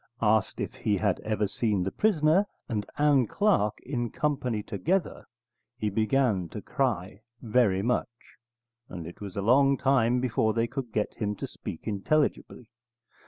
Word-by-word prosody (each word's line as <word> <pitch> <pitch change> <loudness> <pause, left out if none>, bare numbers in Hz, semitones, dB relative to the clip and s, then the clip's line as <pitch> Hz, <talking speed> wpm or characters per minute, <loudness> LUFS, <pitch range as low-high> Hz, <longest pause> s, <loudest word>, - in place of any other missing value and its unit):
Asked 110 -1 +2
if - - -3
he 105 -1 0
had 100 -2 0
ever 105 -1 -1
seen 105 -2 0
the 95 - -2
prisoner 185 - +3 0.2
and 105 -5 -3
Ann 145 -5 +4
Clark 110 - +1
in 120 -3 -2
company 130 -8 -1
together, 165 - -2 0.5
he 105 -3 -1
began 110 -4 +1
to 105 - -6
cry 105 -7 -2 0.2
very 110 -5 +2
much, 125 +2 +1 0.8
and 85 -3 -7
it 85 - -10
was 100 -3 -7
a 100 - -2
long 135 +5 +4
time 125 -3 +2
before 110 -3 +1
they 115 0 +2
could 120 0 -5
get 105 0 -1
him 105 -1 -2
to - - -5
speak - - -8
intelligibly. 120 +3 -1
115 Hz, 155 wpm, -28 LUFS, 105-135 Hz, 0.8 s, Ann